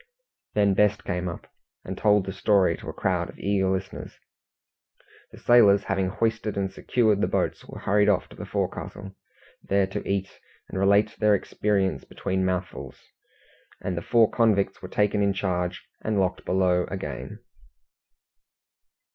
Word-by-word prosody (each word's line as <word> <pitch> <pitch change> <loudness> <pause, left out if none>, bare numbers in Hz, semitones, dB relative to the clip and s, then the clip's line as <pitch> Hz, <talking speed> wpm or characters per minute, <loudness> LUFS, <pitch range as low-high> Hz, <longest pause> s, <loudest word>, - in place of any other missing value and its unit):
Then 100 -2 +3
Best 105 +1 +2
came 90 -1 -2
up, 85 - -8 0.4
and 95 - -5
told 105 -1 +3
the 95 - -4
story 100 -4 +3
to - - -9
a - - -2
crowd - - -1
of - - -12
eager 100 -1 0
listeners. 95 0 -4 1.1
The - - -13
sailors 105 -5 +5
having 95 -1 0
hoisted 110 0 -1
and 95 -1 -2
secured 110 -2 +1
the - - +2
boats, - - -1
were - - -10
hurried 105 +1 +3
off - - +1
to - - -13
the - - -8
forecastle, 95 0 -4 0.5
there 100 0 +1
to 95 - -5
eat, 100 0 -2 0.3
and 95 - -4
relate 100 +2 +3
their 105 -1 +4
experience 95 -7 -1
between 95 0 -3
mouthfuls, 90 -1 -3 0.8
and 95 - -3
the 85 - -3
four 115 +4 +4
convicts 100 -4 +1
were 90 - -8
taken 105 +1 +1
in 100 -1 +2
charge 90 -2 -2 0.2
and 110 -2 0
locked 95 -1 -1
below 90 -1 +2
again. 65 -9 -6
100 Hz, 155 wpm, -25 LUFS, 95-105 Hz, 1.1 s, sailors